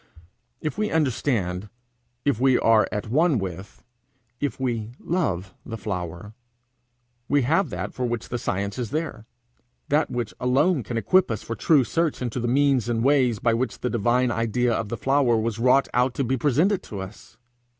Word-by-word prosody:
If 155 +5 -3
we 215 0 +1
understand, 115 - 0 0.6
if 140 -6 +1
we 130 -1 +4
are 115 -1 +4
at 105 +1 -4
one 155 +1 +3
with, 95 -1 -6 0.6
if 145 -1 -2
we 120 -3 -2
love 100 - -2
the 115 -2 -6
flower, 95 0 -5 1.0
we 145 -2 +3
have 165 +10 +2
that - - -5
for 130 - -4
which 120 -2 -3
the 120 - -3
science 100 +1 -2
is 120 -3 -3
there, 150 -7 -4 0.6
that 150 +2 +2
which 120 -3 -3
alone 135 +6 +2
can 115 +1 -4
equip 185 +10 +3
us - - -3
for - - -4
true 150 -5 +4
search 165 +4 -1
into 125 0 -3
the 120 - -1
means 135 -2 +2
and 115 -1 0
ways 130 -4 +3
by 115 +2 +1
which 120 0 -2
the 125 - -1
divine 120 +2 +2
idea 115 +1 0
of 110 -1 -2
the 120 - -3
flower 135 -4 +2
was 110 0 -2
wrought 130 +3 +4
out 125 +1 +2
to 140 - 0
be 130 +1 0
presented 155 - +2
to 100 - -8
us. 95 +3 -11
125 Hz, 180 wpm, -24 LUFS, 110-140 Hz, 1.0 s, we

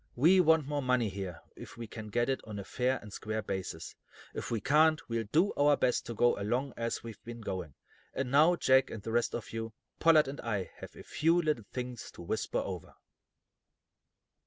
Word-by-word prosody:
We 170 +9 +5
want 160 -3 +5
more 145 0 -2
money 125 -4 +2
here, 95 -4 -6
if - - -11
we 115 - -5
can 110 0 -8
get 120 +3 0
it 135 -1 0
on 105 -2 -7
a 100 - -4
fair 125 +6 0
and 105 -2 -11
square 110 +1 -3
basis. 95 -5 -5 0.4
If - - -5
we 115 - 0
can't, 155 +7 +4
we'll 115 -1 -2
do 175 +7 +3
our 145 0 +4
best 125 -1 +1
to 120 - -5
go 120 0 +3
along 120 +6 -1
as 115 0 -3
we've 115 -2 -9
been 120 0 -8
going. 95 -9 -5 0.4
And 130 -2 -2
now, 155 +5 +6
Jack, 130 -5 +4
and 110 -3 -7
the 115 - -4
rest 120 +1 +1
of 115 - -6
you, 115 -1 -4 0.3
Pollard 155 -3 +6
and 140 +1 -6
I 105 -5 -2
have - - -10
a - - -10
few 165 +3 +2
little 150 -10 0
things 125 -1 -5
to - - -10
whisper - - -2
over." - - -4
120 Hz, 205 wpm, -31 LUFS, 110-145 Hz, 0.4 s, now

